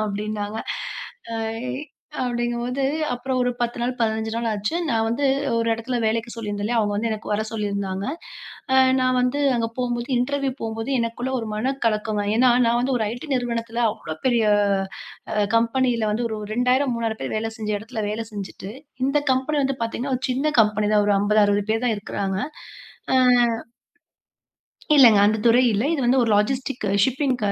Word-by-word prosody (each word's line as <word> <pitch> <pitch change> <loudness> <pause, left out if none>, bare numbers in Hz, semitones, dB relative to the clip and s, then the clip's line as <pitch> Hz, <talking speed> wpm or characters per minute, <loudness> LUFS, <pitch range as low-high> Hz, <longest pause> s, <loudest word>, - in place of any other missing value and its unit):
அப்படின்னாங்க. 210 +1 -3 0.7
அ - - -3 0.3
இ - - -2 0.5
அப்படிங்கும்போது, 240 +1 -2 0.3
அப்பறம் 255 +1 -2
ஒரு 250 0 +2
10 240 0 -1
நாள், 245 +2 0
15 220 -1 0
நாள் 230 0 -2
ஆச்சு. 205 +7 -2 0.2
நான் 225 -1 +1
வந்து 235 +5 -1 0.3
ஒரு 230 0 +1
இடத்துல 230 +3 -3
வேலைக்கு 225 +2 0
சொல்லிருந்தேன் 205 -3 -4
இல்லையா? 235 +2 +1
அவுங்க 205 -1 0
வந்து 225 +3 0
எனக்கு 215 -1 -5
வர 210 +1 +1
சொல்லிருந்தாங்க. 200 -3 -3 0.7
அ - - +5 0.2
நான் 255 0 +2
வந்து 250 +3 0 0.2
அங்க 230 - 0
போகும்போது, 240 -1 -2
இன்டர்வியூ 275 +2 0
போகும்போது 225 +2 -4
எனக்குள்ள 235 +2 -3
ஒரு 225 - -4
மனக் 265 +6 -2
கலக்கமா 215 -1 0
ஏன்னா, 250 +1 +5 0.2
நான் 235 +1 +2
வந்து 260 +2 0
ஒரு 225 - 0
IT 245 +5 -7
நிறுவனத்துல 235 -1 -2
அவ்வளவு 155 -6 -8
பெரிய 240 -3 +3 0.9
அ - - -3 0.2
கம்பெனில 235 -1 +1
வந்து 235 +2 -1
ஒரு 220 -1 -4
2000, 250 +4 +2
3000 225 -1 -2
பேரு - - -3
வேலை 225 +1 -2
செஞ்ச 215 -1 -3
எடத்துல 220 +1 -5
வேலை 225 +2 -3
செஞ்சிட்டு, 195 -1 -7 0.3
இந்த 280 +2 +2
கம்பெனி 265 +4 0
வந்து 270 0 -1
பாத்தீங்கன்னா, 245 +4 -2
ஒரு 250 - -9
சின்ன 275 +4 0
கம்பெனி 210 0 0
தான். 210 -1 +4
ஒரு 205 - +3
50, 210 +1 +3
60 205 0 +1
பேர் 225 +2 0
தான் 230 - +2
இருக்குறாங்க. 195 -1 -3 0.8
அஹ் 250 -2 +5 1.5
இல்லங்க, 230 -7 +8
அந்த 220 +1 +2
துறை 240 +2 +5
இல்லை. 215 +8 +1
இது 285 - -2
வந்து 255 +1 +4
ஒரு 225 - +1
லாஜிஸ்டிக்ஸ், 240 -2 -1
ஷிப்பிங் 265 0 0
230 Hz, 170 wpm, -23 LUFS, 215-250 Hz, 1.5 s, இல்லங்க